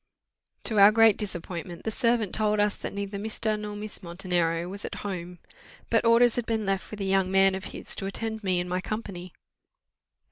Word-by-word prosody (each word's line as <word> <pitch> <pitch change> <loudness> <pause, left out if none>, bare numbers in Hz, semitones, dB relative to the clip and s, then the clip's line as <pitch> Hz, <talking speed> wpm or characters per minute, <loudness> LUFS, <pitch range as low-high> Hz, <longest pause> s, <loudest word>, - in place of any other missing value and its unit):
To 215 -3 0
our 200 +1 +9
great 225 -1 +6
disappointment 175 -3 -5
the 220 - -2
servant 230 -2 +1
told 215 -1 +1
us 205 0 +2
that - - -6
neither 200 0 -4
Mr. 215 0 -1
nor 210 0 -5
Miss 210 0 -5
Montenero 170 -1 -1
was 200 +2 -7
at - - -5
home. 180 -2 -5 0.5
But 230 0 +3
orders 235 +1 +5
had 240 - -2
been 220 -2 -1
left 195 -1 -1
with 210 -1 -7
a - - -1
young 190 -1 +2
man 195 0 +4
of 190 0 -5
his - - -4
to 195 - -3
attend 220 +2 -4
me 185 -2 +1
and 175 - -3
my 180 +1 -1
company. 190 -4 -5
200 Hz, 200 wpm, -27 LUFS, 185-215 Hz, 0.5 s, our